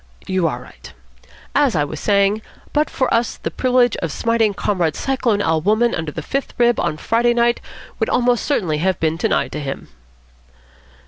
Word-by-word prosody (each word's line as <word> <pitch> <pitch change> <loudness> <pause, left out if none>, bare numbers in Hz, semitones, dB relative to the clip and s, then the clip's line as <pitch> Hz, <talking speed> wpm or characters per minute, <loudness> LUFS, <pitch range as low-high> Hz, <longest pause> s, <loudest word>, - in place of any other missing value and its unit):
"You 185 -3 +1
are 120 -6 -3
right. - - -13 0.6
As 280 -6 +3
I 150 - +2
was 145 +1 -5
saying, 200 +1 +2 0.3
but 300 +1 +2
for 260 - 0
us 230 0 +1
the - - -4
privilege 250 -1 +2
of 165 -4 -3
smiting 225 +2 +1
Comrade 175 -8 0
Cyclone 240 -6 0
Al. 160 -2 +1
Wolmann 215 +6 +2
under 160 -2 -3
the 160 - -6
fifth 275 - -3
rib 240 -1 +3
on 155 - -1
Friday 235 +6 +1
night 235 0 +2 0.4
would - - 0
almost 245 -1 +2
certainly 175 - 0
have 185 +1 0
been 160 0 +1
denied 165 - 0
to 150 - -4
him." 135 -2 -6
210 Hz, 180 wpm, -19 LUFS, 160-240 Hz, 0.6 s, As